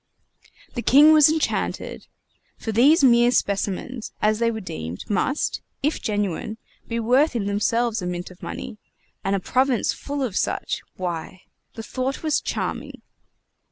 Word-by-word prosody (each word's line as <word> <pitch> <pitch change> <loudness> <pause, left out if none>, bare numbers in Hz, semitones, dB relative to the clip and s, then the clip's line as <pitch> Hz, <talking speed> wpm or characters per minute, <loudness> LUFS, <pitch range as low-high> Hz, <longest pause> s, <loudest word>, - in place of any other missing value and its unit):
The 240 - -3
king 295 +6 +7
was 305 -1 +7
enchanted; 315 0 -2 0.5
for 225 - -4
these 275 - +5
mere 240 -2 +6
specimens, 210 +2 -1
as 215 +1 +2
they 235 0 +2
were 220 -1 -3
deemed, 80 - -6
must, 265 +8 0 0.2
if 300 +3 0
genuine, 205 -1 -2 0.3
be 230 0 -2
worth 255 +6 +3
in 215 -4 -1
themselves 225 +2 0
a 180 - -3
mint 180 0 -4
of 180 - -17
money; 210 - -7 0.4
and 195 +1 +1
a - - 0
province 255 +4 +1
full 285 -1 -4
of 225 -8 -3
such - - -1
why, 180 0 -5 0.3
the 225 - -6
thought 260 +5 -3
was 310 -1 +1
charming! - - -4
230 Hz, 150 wpm, -23 LUFS, 200-265 Hz, 0.5 s, king